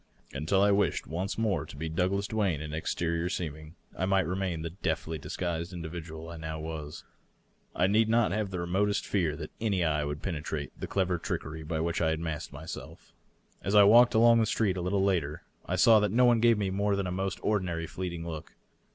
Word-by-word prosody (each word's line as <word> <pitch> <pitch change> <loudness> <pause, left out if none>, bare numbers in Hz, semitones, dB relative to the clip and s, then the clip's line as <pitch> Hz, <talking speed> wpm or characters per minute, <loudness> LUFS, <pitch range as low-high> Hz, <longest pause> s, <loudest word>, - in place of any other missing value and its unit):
Until 80 +8 +1
I 100 - +5
wished 100 -5 +1
once 90 +5 -3
more 110 -6 +1
to - - -11
be 80 +2 -3
Douglas 95 +5 0
Duane 100 -8 0
in 75 0 -6
ex 80 - -2
terior 85 0 -1
seeming, 80 -2 -5 0.2
I 95 - -1
might 95 -1 +3
remain 90 -3 -2
the 85 - -4
deftly 80 -3 -3
disguised 85 +3 -3
individual 80 -1 -7
I 85 - -7
now 80 0 -5
was. 80 -2 -6 0.7
I 90 - +3
need 110 +3 +3
not 115 -1 +3
have 105 -1 -1
the 90 -2 -4
remotest 95 +4 0
fear 85 -7 0
that - - -7
any 100 -5 +1
eye 75 -2 +1
would 75 0 -4
penetrate 80 -4 -3
the - - -6
clever 90 -3 0
trickery 80 -1 -4
by 80 0 -3
which 85 0 -1
I 80 - +3
had 80 0 -1
masked 80 -1 -4
myself. 75 +3 -9 0.5
As 100 +3 -1
I 105 - +9
walked 120 +4 +7
along 115 +1 +6
the 110 - +2
street, 105 -4 +1
a 90 - -3
little 95 +2 +1
later, 85 -7 0 0.2
I - - 0
saw 110 -2 +6
that 105 -2 +1
no 125 +3 +4
one 120 -1 +5
gave 115 -1 +5
me 100 -2 -1
more 100 +1 +1
than 100 -1 -1
the 90 - -2
most 95 0 -2
or 105 -1 +2
dinary 85 -3 -3
fleeting 85 -2 -5
look. 80 -1 -7
90 Hz, 215 wpm, -29 LUFS, 80-100 Hz, 0.7 s, I